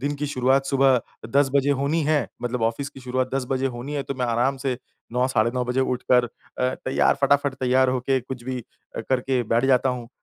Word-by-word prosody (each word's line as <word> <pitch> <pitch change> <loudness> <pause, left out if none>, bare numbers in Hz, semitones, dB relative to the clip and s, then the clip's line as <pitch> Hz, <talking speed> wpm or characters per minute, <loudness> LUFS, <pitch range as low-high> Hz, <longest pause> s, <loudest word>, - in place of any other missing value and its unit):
दिन 145 +2 -1
की 150 - -3
शुरुआत 135 0 +2
सुबह 135 -1 +4
अ, 115 - -2 0.3
10 140 -1 +4
बजे 140 0 +3
होनी 155 +3 +1
है 150 -4 +2 0.2
मतलब 120 -1 -2
ऑफिस 115 +5 -1
की 135 - -13
शुरुआत 130 0 -2
10 135 - 0
बजे 135 0 +1
होनी 130 +5 -6
है 140 - -1
तो 140 - -5
मैं 125 -1 -1
आराम 120 +4 +1
से 130 -2 -2 0.4
9, 125 +1 +2
साढ़े 115 -2 +2
नौ 125 -1 0
बजे 125 +2 0
उठकर 125 -1 +2
अ, - - -5 0.5
तैयार, 130 - +1
फटाफट 140 0 +3
तैयार 130 +1 +3
होके 130 +1 0
कुछ 125 0 -8
भी 130 0 -3 0.4
अ, - - -2
करके 130 -1 +1
बैठ 120 +2 +3
जाता 130 0 +3
हूँ। 125 -2 -3
130 Hz, 225 wpm, -24 LUFS, 125-135 Hz, 0.5 s, सुबह